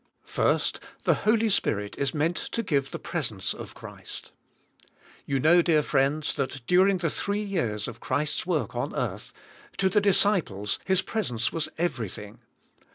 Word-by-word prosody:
1. - - +3 0.4
The - - +4
Holy 225 +1 +2
Spirit 105 - 0
is 140 -1 0
meant 160 +3 0
to 230 - -3
give 140 -8 0
the - - -5
presence - - -2
of - - -9
Christ. - - -9 1.0
You 135 -1 +1
know, 170 +6 +6
dear 160 -3 +3
friends, 140 +2 +1
that 135 -3 -3
during 185 +5 +4
the 170 -2 0
three 205 +1 -1
years 120 - -1
of 120 -1 -8
Christ's 150 +7 -1
work 165 -5 -1
on - - -2
earth, - - -3 0.5
to 190 - +3
the 210 +1 +3
dis 200 -2 +5
ciples, 110 - 0
His 190 0 +3
presence 125 - -1
was 165 -2 -2
everything. 115 - -3
155 Hz, 160 wpm, -27 LUFS, 130-190 Hz, 1.0 s, know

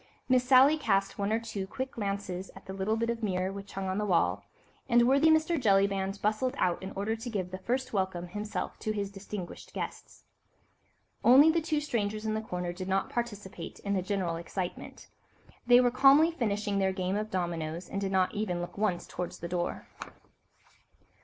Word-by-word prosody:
Miss 255 -1 +4
Sally 270 +4 +6
cast 195 -6 0
one 200 +1 0
or 220 - +2
two 215 -4 -5
quick 260 +6 -4
glances 195 -3 -4
at 195 - -13
the 190 - -7
little 195 +3 -1
bit 230 +1 0
of 235 0 -5
mirror 190 -2 -1
which 200 0 -9
hung 195 0 -3
on 190 +2 -1
the - - 0
wall, 180 -4 +1 0.5
and 240 0 +5
worthy 275 +4 +5
Mr. 315 0 +3
Jellyband 195 -2 +2
bustled 215 +5 0
out 180 -1 +1
in 190 - -5
order 205 +3 -1
to 230 +2 -6
give 190 -5 -3
the 185 - -5
first 250 +7 -2
welcome 185 -3 -1
himself 210 +3 -4
to 215 - -2
his 200 -1 -3
distinguished 195 -2 -8
guests. - - -6 1.0
Only 280 +6 +8
the 330 +1 +1
two 310 -1 0
strangers 215 -7 -2
in 215 - 0
the 220 - -1
corner 180 -4 -4
did 185 +1 -6
not 195 0 0
participate 205 -7 -5
in 200 - -2
the 190 - +1
general 185 -3 -1
excitement. 175 +2 -6 0.6
They 245 0 +8
were 245 -1 +3
calmly 275 +6 +6
finishing 210 -8 -1
their 190 -1 +1
game 185 0 -1
of 215 +1 -2
dominoes, 170 -2 -3
and 200 - -4
did 195 -1 -2
not 185 -1 +2
even 205 -5 -2
look 175 +3 -6
once 200 -5 0
towards 180 -1 -5
the 170 - -6
door. 175 0 -3
200 Hz, 190 wpm, -30 LUFS, 190-235 Hz, 1.0 s, Only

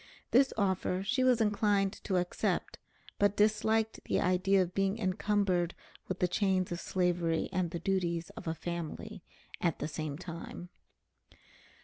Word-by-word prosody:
This 265 +3 +5
offer 190 -2 0
she 255 +6 +1
was 250 -2 +4
inclined 205 -2 +2
to 190 - 0
accept, 175 0 -1 0.4
but 205 0 +3
disliked 220 +1 +2
the - - +1
idea 185 +1 +3
of 180 0 -7
being 195 +1 +1
encumbered 190 -3 +1 0.3
with 185 - -3
the 180 - +2
chains 190 -1 +1
of 175 - -2
slavery 175 -3 0
and 180 -1 0
the 170 - -4
duties 170 -2 -1
of 225 -6 -10
a 160 - -1
family 175 +5 -5 0.4
at 170 -3 +1
the - - -3
same 155 -2 -4
time. 175 0 -8
185 Hz, 145 wpm, -32 LUFS, 175-205 Hz, 0.4 s, This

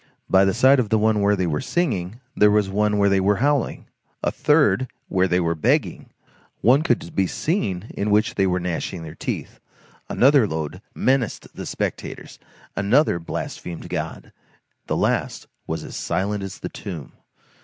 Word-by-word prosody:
By 95 +1 +5
the 95 - +2
side 130 +3 +5
of 115 -5 0
the 110 - +3
one 110 -1 +2
where 100 +1 +3
they 95 -2 0
were 75 -3 -1
singing, 120 - -2
there 105 - +5
was 105 -2 +2
one 105 +1 +1
where 100 0 +4
they 100 -1 +3
were 100 +2 +3
howling; 140 +3 0 0.4
a - - +1
third 145 -3 +3 0.2
where 95 -1 +2
they 90 0 +2
were 85 -1 +1
begging; 80 - 0 0.5
one 130 +5 +5
could 170 0 -1
be 95 - +2
seen 110 - -2
in 105 - -1
which 105 +2 +2
they 95 -1 +2
were 90 0 +1
gnashing 85 0 -3
their 80 -1 -8
teeth; - - -5 0.5
another 135 -3 +4
load 80 +2 -4
menaced 130 -5 0
the - - -6
spectators, - - -5 0.4
another 100 - +3
blasphemed 85 0 -6
God; - - -5 0.5
the - - 0
last - - -1 0.2
was - - -3
as - - -7
silent 100 +2 -1
as 95 -1 -6
the - - -6
tomb. 85 -8 -7
100 Hz, 170 wpm, -23 LUFS, 90-125 Hz, 0.5 s, By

